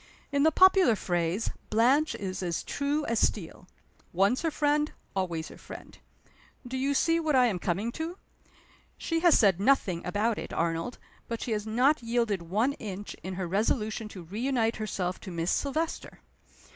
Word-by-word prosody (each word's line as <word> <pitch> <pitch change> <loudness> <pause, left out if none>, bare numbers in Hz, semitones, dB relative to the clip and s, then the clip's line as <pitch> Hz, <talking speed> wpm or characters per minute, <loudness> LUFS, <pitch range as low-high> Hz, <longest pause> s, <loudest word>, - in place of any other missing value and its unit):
In 280 0 +1
the 315 +2 +5
popular 375 - +6
phrase, 175 +2 -1 0.2
Blanche 260 +8 +3
is 190 -1 -4
as 175 -3 -2
true 290 +2 -1
as 230 -1 0
steel. 180 -2 -1 0.5
Once 195 +8 +2
her 330 - +1
friend, 295 0 +1 0.2
always 170 -4 -2
her - - -13
friend. - - -11 0.7
Do 255 - -5
you 275 +2 0
see 330 +4 +3
what 315 -3 +1
I 255 -1 +6
am 205 -7 0
coming 195 +7 -1
to? 325 +7 -5 0.8
She 330 -1 -1
has 345 -1 +6
said 195 -5 +4
nothing 200 -7 +2
about 210 +5 0
it, - - -7
Arnold; 165 +7 -1 0.3
but 230 -1 -4
she 245 - -4
has 210 0 -2
not 255 +7 +3
yielded 230 -5 0
one 210 +11 0
inch 205 -5 -7
in 185 0 -5
her 185 -1 -3
resolution 215 +3 0
to 190 -4 -10
reunite 225 +5 -1
herself 190 -4 -3
to 195 - -9
Miss 170 -1 -1
Silvester. 310 +4 -2
225 Hz, 170 wpm, -28 LUFS, 185-280 Hz, 0.8 s, popular